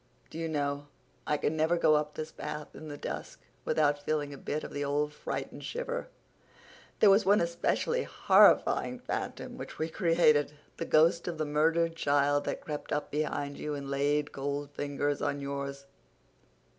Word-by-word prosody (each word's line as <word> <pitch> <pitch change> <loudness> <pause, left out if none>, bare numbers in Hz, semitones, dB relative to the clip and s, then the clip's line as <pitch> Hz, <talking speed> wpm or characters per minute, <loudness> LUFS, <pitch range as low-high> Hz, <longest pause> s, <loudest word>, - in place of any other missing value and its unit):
Do 160 - -6
you 165 0 -2
know, 145 -1 -2 0.4
I 150 - +2
can 150 +2 -1
never 160 +2 +2
go 155 - +4
up 150 0 0
this 155 0 -5
path 150 0 -6
in 155 - -9
the 145 -1 -6
dusk - - -6 0.3
without 145 -1 +2
feeling 145 -1 -1
a - - -7
bit 150 - -3
of - - -7
the 145 - -2
old 145 +1 0
fright - - -4
and - - -10
shiver? - - -4 0.9
There 205 - +7
was 200 +2 +5
one 200 +2 +5
especially 170 - 0
horrifying - - +4
phantom - - -5
which - - -8
we 160 +1 -2
created—the 155 -4 +1
ghost 165 +2 +4
of 170 -2 -3
the 155 - -1
murdered 165 +3 +2
child 145 -2 +2
that - - -3
crept 150 -1 -5
up 145 - -2
behind 145 -1 -2
you 150 -1 -3
and 140 -1 -6
laid 145 +1 +1
cold 140 +1 -3
fingers 145 0 -2
on 140 - -1
yours. 140 0 -5
150 Hz, 170 wpm, -30 LUFS, 145-160 Hz, 0.9 s, There